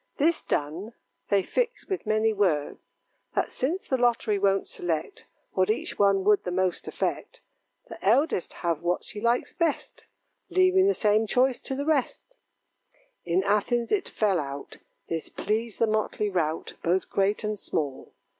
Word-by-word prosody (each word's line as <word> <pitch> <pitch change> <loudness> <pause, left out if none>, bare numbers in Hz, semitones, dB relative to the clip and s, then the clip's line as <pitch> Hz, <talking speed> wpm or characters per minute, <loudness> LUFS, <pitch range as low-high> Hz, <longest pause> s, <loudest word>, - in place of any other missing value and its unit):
This 325 +3 +2
done, 165 +10 -3 0.4
they 200 -1 +3
fix, - - -2
with 380 - -3
many 215 +1 +2
words, 175 -8 -1 0.4
That - - 0
since 325 +9 -2
the 260 - 0
lottery 230 -4 +2
won't 195 0 +2
select 165 -3 -3 0.3
What 185 +1 +2
each 220 - -1
one 200 -1 +4
would 210 +1 +4
the - - -3
most 185 0 -1
affect, - - -3 0.5
The - - -11
eldest 235 - +2
have 165 -3 0
what 175 +1 0
she 210 - -5
likes 235 +2 +1
best, 330 -3 -2 0.4
Leaving 370 +1 +4
the 400 - +3
same 215 +1 +2
choice 255 +2 +2
to 265 - -4
the 285 +2 -3
rest. 315 - -1 0.9
In 175 +2 +1
Athens 210 +4 +1
it 405 -3 +1
fell 200 -5 +1
out, 140 -1 -6 0.3
This 165 -1 -4
pleased 220 +1 -2
the 230 - +3
motley 215 -1 -1
rout, 160 -3 -1
Both 180 +3 0
great 200 +2 +1
and 215 0 -1
small. 140 -7 -3
210 Hz, 155 wpm, -27 LUFS, 185-250 Hz, 0.9 s, one